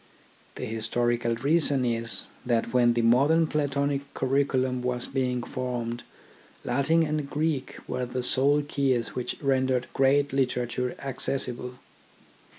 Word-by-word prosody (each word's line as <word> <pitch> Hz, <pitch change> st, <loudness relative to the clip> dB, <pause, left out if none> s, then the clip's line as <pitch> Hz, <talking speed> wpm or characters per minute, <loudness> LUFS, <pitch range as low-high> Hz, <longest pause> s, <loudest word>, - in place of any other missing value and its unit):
The -, -, -4 dB
historical 115 Hz, +1 st, 0 dB
reason 140 Hz, +1 st, +2 dB
is, 115 Hz, -1 st, -2 dB, 0.2 s
that 115 Hz, -1 st, 0 dB
when 120 Hz, -1 st, +4 dB
the 120 Hz, 0 st, 0 dB
modern 140 Hz, +8 st, +4 dB
Platonic 140 Hz, -2 st, -1 dB
curriculum 130 Hz, -1 st, +1 dB
was 125 Hz, -1 st, -1 dB
being 125 Hz, -2 st, -1 dB
formed 120 Hz, -2 st, -3 dB, 0.6 s
Latin 140 Hz, +7 st, +2 dB
and 150 Hz, -2 st, -2 dB
Greek 150 Hz, -2 st, -1 dB
were 125 Hz, 0 st, -2 dB
the 125 Hz, +1 st, -3 dB
sole 140 Hz, +4 st, +3 dB
keys 135 Hz, -5 st, 0 dB
which 125 Hz, -, -4 dB
rendered 130 Hz, -2 st, +1 dB
great 140 Hz, +1 st, +3 dB
literature 125 Hz, -2 st, -1 dB
accessible. 125 Hz, -2 st, -3 dB
130 Hz, 120 wpm, -27 LUFS, 120-140 Hz, 0.6 s, when